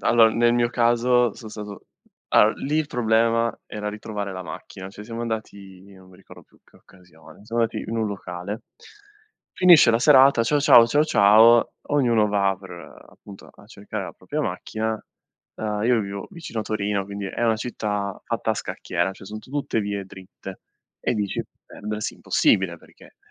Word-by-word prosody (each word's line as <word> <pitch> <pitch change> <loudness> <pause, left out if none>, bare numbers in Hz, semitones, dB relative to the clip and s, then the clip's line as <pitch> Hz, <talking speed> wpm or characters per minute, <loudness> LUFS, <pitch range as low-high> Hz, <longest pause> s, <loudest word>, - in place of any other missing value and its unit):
Allora, 115 -1 +5
nel 120 +1 +2
mio 120 0 +2
caso 120 0 +2
sono 110 -3 -11
stato 105 -2 -9 0.5
allora, 105 +1 +6
lì 145 +3 -2
il 155 - 0
problema 115 -2 +1
era 105 -1 -5
ritrovare 105 -1 -6
la 95 0 -6
macchina, 95 +1 -9
cioè 100 +2 -11
siamo 115 +1 -7
andati 100 -5 -6
non 95 -1 -17
mi 95 - -18
ricordo 95 - -16
più - - -28
in - - -32
che - - -24
occasione, 90 -3 -19
siamo 115 +2 -2
andati 115 -1 -2
in 115 - -4
un 110 -1 0
locale. 95 +1 -6 0.9
Finisce 175 -9 +6
la 115 - +2
serata, 135 -2 +6
ciao 145 +6 +1
ciao, 120 -5 +7
ciao 145 +6 +2
ciao, 110 -2 +5 0.2
ognuno 120 -7 +2
va 100 -1 +1
per 95 -1 -13 0.4
appunto 100 -2 -14
a - - -19
cercare 105 -2 -7
la 85 - -8
propria - - -5
macchina. 110 0 -3 0.6
Uhm, 105 -1 -3
io 120 -1 +3
vivo 100 -1 -6
vicino 160 -10 -6
a - - -3
Torino, 105 -2 -2
quindi 100 0 -6
è 120 - -3
una 115 -1 +2
città 105 -4 -4
fatta - - -2
a - - +1
scacchiera, 85 +2 -3
cioè 95 - -14
son 110 +2 -7
tutte 135 -1 -3
vie 100 -1 -4
dritte 95 0 -11 0.4
e - - 0
dici: 105 -3 -2 0.2
"Perdersi 105 0 -5
è - - -20
impossibile - - +1
perché - - -20
110 Hz, 180 wpm, -23 LUFS, 100-115 Hz, 0.9 s, ciao